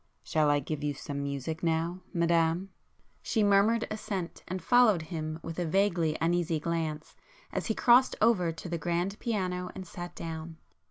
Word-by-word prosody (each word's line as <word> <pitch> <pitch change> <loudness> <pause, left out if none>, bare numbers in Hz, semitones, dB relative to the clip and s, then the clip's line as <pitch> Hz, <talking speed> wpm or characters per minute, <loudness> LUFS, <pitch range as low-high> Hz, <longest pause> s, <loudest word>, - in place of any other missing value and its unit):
"Shall 155 -2 +2
I 145 0 +4
give 150 +1 -4
you 145 -1 -1
some 140 0 -5
music 140 +3 -3
now, 170 +2 0
Madame?" 170 +2 +1 0.5
She 220 - +1
murmured 205 +3 +4
assent, 195 -5 -4
and 185 +1 -3
followed 215 -3 +4
him 155 -1 -4
with 165 +1 -5
a 175 - 0
vaguely 170 -4 +2
uneasy 170 -1 +1
glance 160 -1 -3 0.4
as - - -2
he 220 - 0
crossed 250 +2 +5
over 205 -7 +3
to 165 +2 -8
the 170 -1 -3
grand 175 +5 -1
piano 180 -5 -2
and 190 - -6
sat 175 0 -8
down. 160 0 -6
170 Hz, 165 wpm, -30 LUFS, 160-190 Hz, 0.5 s, crossed